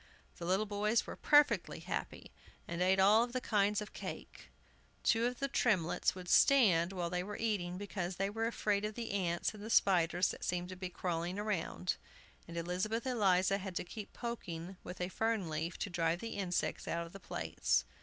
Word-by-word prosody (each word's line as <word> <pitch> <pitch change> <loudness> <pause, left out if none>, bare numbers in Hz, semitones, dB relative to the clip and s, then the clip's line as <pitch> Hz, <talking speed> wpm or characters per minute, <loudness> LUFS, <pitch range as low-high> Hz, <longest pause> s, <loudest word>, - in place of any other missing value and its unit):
The 170 - -6
little 190 +4 +2
boys 210 +2 +1
were - - -6
perfectly 295 0 +4
happy, - - -5 0.4
and 170 +1 -3
ate 185 +1 +4
of 190 - +6
all 220 +4 +6
the 250 +1 -2
kinds 210 -3 +1
of 210 - -8
cake. - - -8 0.5
Two 230 +1 +3
of 250 0 -3
the 275 - -1
Tremletts 205 -13 +1
would 180 -1 -8
stand 190 -9 +5
while 175 -3 -3
they 180 0 0
were 205 +3 -5
eating, 190 -6 -1
because 190 -2 -4
they 195 +2 0
were 225 +3 -1
afraid 210 -3 0
of 210 0 -3
the 235 -1 -4
ants 175 -2 0
and 210 - -10
the 220 - -6
spiders 180 -4 +4
that - - -6
seemed 180 0 -1
to 185 - -6
be 185 0 -5
crawling 175 0 -2
round. 200 -3 -2 0.5
And 170 0 -7
Elizabeth 185 +8 -1
Eliza 195 -5 +3
had 190 -2 -6
to - - -1
keep 205 +3 -8
poking 190 -7 -5
with 180 - -8
a 180 - 0
fern 220 -5 -1
leaf 160 +3 -3
to - - -3
drive 170 0 +1
the 230 - -5
insects 185 -3 -1
out 170 0 -1
of 170 - -13
the 195 - -9
plates. - - 0
190 Hz, 195 wpm, -34 LUFS, 175-215 Hz, 0.5 s, of